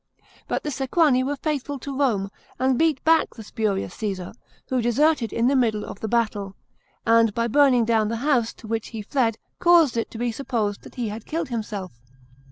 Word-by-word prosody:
But - - -2
the 300 - -3
Sequani 270 -1 +2
were 285 +2 -1
faithful 285 -1 -3
to 275 +1 -6
Rome, 215 -8 0 0.3
and 260 +1 +2
beat 315 0 +1
back 325 0 +3
the 225 - -9
spurious 200 -4 -2
Caesar, 195 -5 -4 0.3
who 255 -1 0
deserted 240 +1 +2
in 230 - 0
the 275 - +3
middle 220 -5 +1
of - - -9
the 220 - -3
battle, 210 -4 -1 0.5
and 230 -1 +5
by 235 0 +1
burning 255 -1 +4
down 220 -2 +2
the 230 - -2
house 245 -6 +2
to 220 - -13
which 225 0 -2
he 220 -3 -7
fled 230 -1 0 0.2
caused 335 -8 +5
it 230 - -1
to - - -9
be 240 +1 -1
supposed 225 -5 -2
that - - -14
he 240 -4 -2
had 215 +1 -8
killed 325 -3 -3
himself. 210 -6 -4
235 Hz, 195 wpm, -24 LUFS, 220-275 Hz, 0.5 s, and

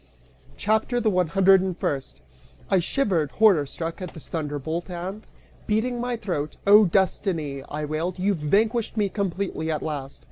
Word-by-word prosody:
CHAPTER 220 +3 +1
THE 220 -2 +2
ONE 180 -2 +2
HUNDRED 195 +2 +5
AND 185 -2 -3
FIRST. 135 - -3 0.5
I 190 - +5
shivered, 175 - 0
horror 195 -10 +4
struck, 165 +6 -5
at 180 - -7
this 160 - -11
thunderbolt 160 +2 -3
and, 185 +4 -6 0.4
beating 235 +3 0
my 245 -1 -2
throat, 155 -9 -3
"Oh 205 +1 +8
Destiny," 170 -6 0
I 150 0 -3
wailed, 160 +5 -2
"you've 195 +1 +1
vanquished 215 +9 +1
me 205 -2 +2
completely, 190 -4 -2
at 155 -1 -1
last!" 140 -3 -5
185 Hz, 155 wpm, -25 LUFS, 155-210 Hz, 0.5 s, Oh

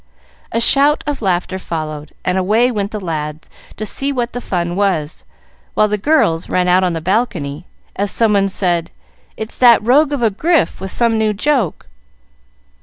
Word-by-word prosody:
A 230 - 0
shout 280 +5 +4
of 290 -3 -3
laughter 185 -1 -1
followed, 155 -4 -5
and 180 - 0
away 215 +7 +2
went 205 -3 -2
the 215 - -5
lads, 155 -4 -5 0.3
to 215 - -4
see 275 +6 -1
what 245 -3 -2
the 245 - -4
fun 175 -5 -2
was, 180 -6 -1 0.5
while 215 - +3
the 210 - 0
girls 195 - +1
ran 180 0 +1
out 180 +1 +4
on 180 -2 0
the 165 - -4
balcony, 180 -6 -2 0.3
as 200 +1 -1
someone 205 -3 +2
said, 175 -3 -1 0.5
"It's 220 +1 -6
that 235 -4 +5
rogue 285 +5 +4
of 280 -4 -2
a 225 - +3
Grif 315 - 0
with 190 - -4
some 230 +1 +1
new 215 -1 +1
joke." 240 - -1
200 Hz, 175 wpm, -17 LUFS, 175-235 Hz, 0.5 s, that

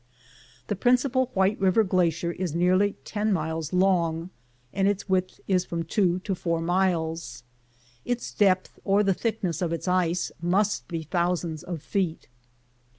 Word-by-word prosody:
The 205 - -2
principal 250 +4 +2
White 190 +2 +2
River 195 +3 +4
glacier 175 -3 +1
is 175 -2 -4
nearly 185 +4 +3
ten 210 0 -1
miles 160 -3 -2
long, 180 -2 +1 0.4
and 195 0 +2
its 200 -1 -1
width 185 -1 0
is 185 -2 +2
from 170 -2 -3
two 180 +1 +1
to 195 - -2
four 170 -2 -1
miles. 165 -7 -1 0.6
Its 245 0 -3
depth, 185 -3 +2
or 200 +1 +3
the 195 -1 +3
thickness 190 -6 -2
of 170 -2 0
its 165 +2 -3
ice, 180 -1 +1
must 195 +4 +1
be 165 -2 -4
thousands 170 -1 -1
of 170 -4 -6
feet. 185 -5 -2
185 Hz, 150 wpm, -26 LUFS, 170-195 Hz, 0.6 s, River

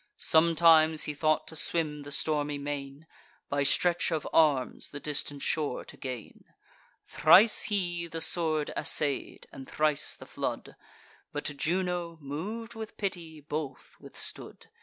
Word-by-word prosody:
Sometimes 160 -1 +4
he 150 - -2
thought 155 +1 +1
to 160 - -8
swim 155 -2 -1
the 145 0 -9
stormy 145 0 0
main, 140 +1 -6 0.4
By 145 0 0
stretch 170 +5 +2
of 160 -2 -2
arms 145 -5 +2
the 145 - -7
distant 145 -1 -2
shore 150 -5 -1
to - - -11
gain. 125 -5 -8 0.6
Thrice 190 +8 +5
he 175 -5 -2
the 165 0 -6
sword 160 -3 +2
assay'd, 145 -3 0
and 135 -1 -10
thrice 150 -2 +1
the - - -12
flood; - - -5 0.6
But 145 0 -4
Juno, 175 +2 -2
mov'd 200 +12 -6
with 225 -1 -8
pity, 170 -6 -5
both 145 -2 -6
withstood. - - -7
155 Hz, 135 wpm, -29 LUFS, 145-170 Hz, 0.6 s, Thrice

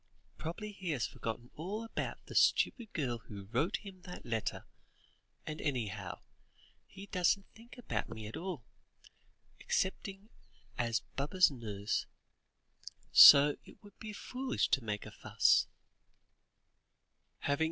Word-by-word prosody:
Probably 175 +7 -5
he 190 -3 -6
has 120 - 0
forgotten 120 +2 -6
all 195 +8 -5
about 225 - -5
the - - -10
stupid 235 -4 +3
girl 125 -7 -2
who 105 -3 -10
wrote 125 - 0
him 190 -3 -11
that 180 -5 -10
letter, 115 -2 -3 0.8
and 155 0 -5
anyhow, 125 -9 -3 0.7
he 195 0 -11
doesn't 190 +1 +1
think 235 +3 -15
about 245 - -3
me 110 -2 -7
at 105 - -7
all, 170 - -5 0.9
excepting 195 +2 -2 0.5
as 115 -2 0
Baba's 150 +5 +3
nurse, 105 -5 -3 1.0
so 145 +1 +10
it - - -17
would 205 -1 -17
be 215 - -6
foolish 255 +5 -2
to 135 - +2
make 105 -1 -3
a - - -9
fuss." - - +3
155 Hz, 120 wpm, -33 LUFS, -, 1.0 s, so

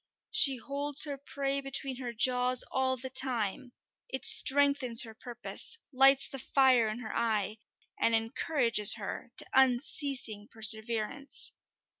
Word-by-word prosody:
She 310 -12 +3
holds 285 +3 +3
her 290 -2 0
prey 275 0 -5
between 270 -1 -7
her 250 -2 -8
jaws 250 +1 0
all 260 0 -3
the 260 +1 -8
time; 245 -2 -4 0.4
it - - -4
strengthens 275 -4 +5
her 225 -1 -12
purpose, 245 - -7 0.2
lights 270 +1 +3
the 270 - -10
fire 260 -3 0
in 215 - -7
her 220 - -9
eye, 215 -2 -4 0.4
and 230 - +1
encourages 230 -1 +3
her 220 +2 -10
to - - -1
unceasing 255 -4 0
perseverance. 220 +5 +1
255 Hz, 130 wpm, -27 LUFS, 225-275 Hz, 0.4 s, strengthens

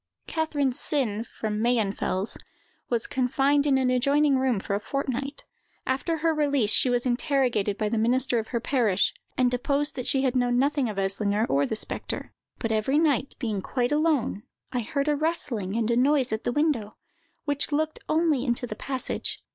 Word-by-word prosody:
Catherine 290 -5 0
Sinn, 240 -6 0
from 215 -2 -4
Mayenfels, 210 -4 +1 0.5
was 235 -2 0
confined 275 +3 +1
in 270 -2 +4
an 255 -1 +2
adjoining 280 +3 +3
room 260 -5 +1
for 200 - -4
a 200 - +1
fortnight. 275 +3 -3 0.4
After 275 +6 -1
her 325 +1 +1
release, 285 -8 +2
she 255 - +4
was 245 0 +1
interrogated 245 -5 +1
by 215 - 0
the 220 +1 0
minister 245 +1 +2
of 220 - -5
her 235 - -2
parish, 230 -6 +1 0.2
and 250 -1 +3
deposed 280 +4 0
that 250 -2 -4
she 270 -1 +2
had 260 -1 +1
known 245 -1 +2
nothing 280 -1 +1
of 210 - -6
Eslinger, 200 +2 0
or 140 +1 +2
the - - -2
spectre; - - -4 0.2
"but 225 - -2
every 220 +6 +1
night, 290 -4 +1
being 215 -5 -2
quite 245 +5 -1
alone, 300 -9 +1 0.3
I 250 - 0
heard 280 +5 -2
a 300 - +3
rustling 260 - -2
and 230 0 +1
a - - +2
noise 265 +1 +3
at 220 +1 -3
the - - +1
window, 265 -7 0 0.5
which 285 0 0
looked 310 +1 0
only 310 -5 +2
into 245 -2 -1
the 215 - -6
passage. 260 +3 -2
255 Hz, 180 wpm, -26 LUFS, 220-285 Hz, 0.5 s, in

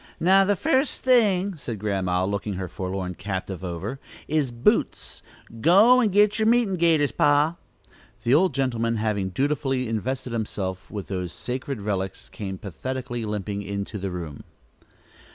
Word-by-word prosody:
"Now 190 +3 +5
the 200 +1 +2
first 275 - +1
thing," 205 -7 +3
said 120 -6 -5
Grandma, 95 -3 0
looking 100 +1 -2
her 90 0 -4
forlorn 95 0 -4
captive 95 -1 -5
over; 95 +9 -4 0.3
"is 150 -4 +1
boots. 120 0 0 0.4
Go 205 - +6
and 220 -5 +2
get 210 +2 +4
on 220 - +3
yer - - +6
meetin' 235 -5 +3
gaiters, 160 -4 +3
pa." 150 +3 +3 0.7
The 120 - +2
old 165 -1 +4
gentleman, 115 -4 0
having 105 -3 -1
dutifully 135 +2 0
invested 125 +3 -3
himself, 95 -4 -3
with 100 -3 -6
those 90 -3 -3
sacred 130 +1 -4
relics, 95 - -3
came 95 +5 -6
pathetically 120 +5 -5
limping 105 -1 -3
into 100 +1 -4
the 95 +1 -3
room. 85 -5 -6
115 Hz, 150 wpm, -25 LUFS, 95-160 Hz, 0.7 s, Go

